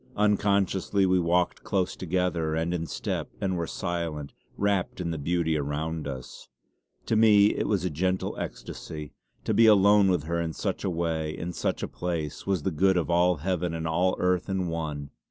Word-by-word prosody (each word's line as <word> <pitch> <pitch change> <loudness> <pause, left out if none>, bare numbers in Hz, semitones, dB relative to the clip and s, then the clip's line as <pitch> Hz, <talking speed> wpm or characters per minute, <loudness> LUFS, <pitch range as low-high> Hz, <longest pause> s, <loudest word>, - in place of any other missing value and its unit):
Unconsciously 100 -1 +2
we 95 0 +3
walked 90 +1 +1
close 95 -2 0
together 90 -3 -1
and 80 +2 -1
in 85 -2 -2
step; - - -3
and 95 -2 -1
were 85 -1 -2
silent, 85 -6 -4 0.2
wrapt 100 -3 0
in 85 -2 -2
the 80 - -3
beauty 80 +1 0
around 75 +2 -2
us. 65 -3 -8 0.6
To 115 - 0
me 105 -2 +6
it - - -2
was 95 -4 0
a - - +1
gentle 90 +5 -1
ecstasy. 75 -2 -7 0.3
To 110 - 0
be 115 +2 +6
alone 100 -1 +6
with 90 -5 +1
her 85 +2 -1
in 80 -1 -3
such - - -3
a 95 - 0
way, 80 -2 -2
in 85 +1 -4
such - - -2
a - - -1
place, 85 -3 -4
was 95 -6 0
the 95 - 0
good 95 +4 +3
of 85 0 0
all 90 +1 +4
heaven 90 -3 -1
and 80 0 -3
all 90 +3 +2
earth 90 +1 0
in 95 -2 -1
one. 75 -4 -4
90 Hz, 190 wpm, -27 LUFS, 80-95 Hz, 0.6 s, me